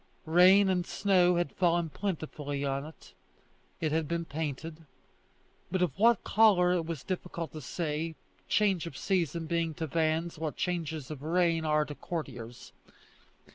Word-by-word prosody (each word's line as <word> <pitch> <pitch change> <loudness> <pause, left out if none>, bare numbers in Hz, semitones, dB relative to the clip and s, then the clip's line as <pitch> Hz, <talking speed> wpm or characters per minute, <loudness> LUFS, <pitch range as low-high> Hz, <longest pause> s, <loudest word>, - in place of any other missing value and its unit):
Rain 185 +5 +6
and 185 -2 +1
snow 180 -1 +3
had 175 -5 0
fallen 170 -2 +1
plentifully 150 -7 -3
on 140 +1 -2
it; 160 - -15 0.7
it 155 -2 -1
had 160 -1 0
been 170 +1 -2
painted, 155 +1 -5 0.8
but 185 -1 +1
of 175 - +1
what 230 +1 +4
colour 195 -5 +4
it 170 -3 -1
was 165 -5 -5
difficult 175 -4 -4
to 155 - -7
say, 160 +2 -3 0.3
change 195 -5 +2
of - - -8
season 170 -4 -1
being 165 -1 -1
to 160 - -3
vans 160 +2 -1
what 155 -2 -3
changes 160 -5 -3
of 145 -3 -7
reign 165 0 +1
are 150 0 +2
to 150 - -7
courtiers. 125 -8 -7
165 Hz, 150 wpm, -30 LUFS, 155-180 Hz, 0.8 s, Rain